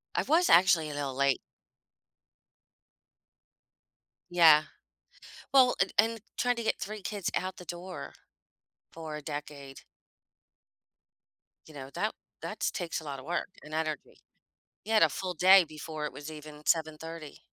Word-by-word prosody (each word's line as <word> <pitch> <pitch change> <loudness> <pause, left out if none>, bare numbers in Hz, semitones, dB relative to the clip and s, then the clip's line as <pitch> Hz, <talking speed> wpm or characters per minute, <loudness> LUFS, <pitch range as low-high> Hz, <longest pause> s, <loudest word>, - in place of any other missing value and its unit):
I - - +2
was 335 +4 +3
actually 170 -3 +5
a - - -6
little 140 -2 -3
late 140 -1 +2 2.9
Yeah. 160 -3 +7 0.9
Well, 260 -2 +6
and 195 -1 +1
and 225 0 +3 0.2
trying 245 0 +1
to 235 - -4
get - - 0
3 215 +1 -5
kids 205 -3 -3
out 185 0 -2
the 180 - -10
door 175 +2 -7 0.8
for 160 -2 -7
a 150 - -8
decade. 145 -2 -7 1.9
You 155 - -14
know, 135 -2 -8
that 215 +1 0 0.3
that's 215 0 -2
takes 170 -3 -4
a - - -12
lotta 140 -3 -6
work 170 +5 -2
and 150 +1 -11
energy. 155 -2 -4 0.6
You 220 - -2
had 215 - +6
a - - +5
full 185 -1 -4
day 185 +3 +7
before 155 0 -6
it - - -4
was 145 +1 -8
even 150 -1 -11
7:30. 160 -1 -2
160 Hz, 140 wpm, -30 LUFS, 150-190 Hz, 2.9 s, Yeah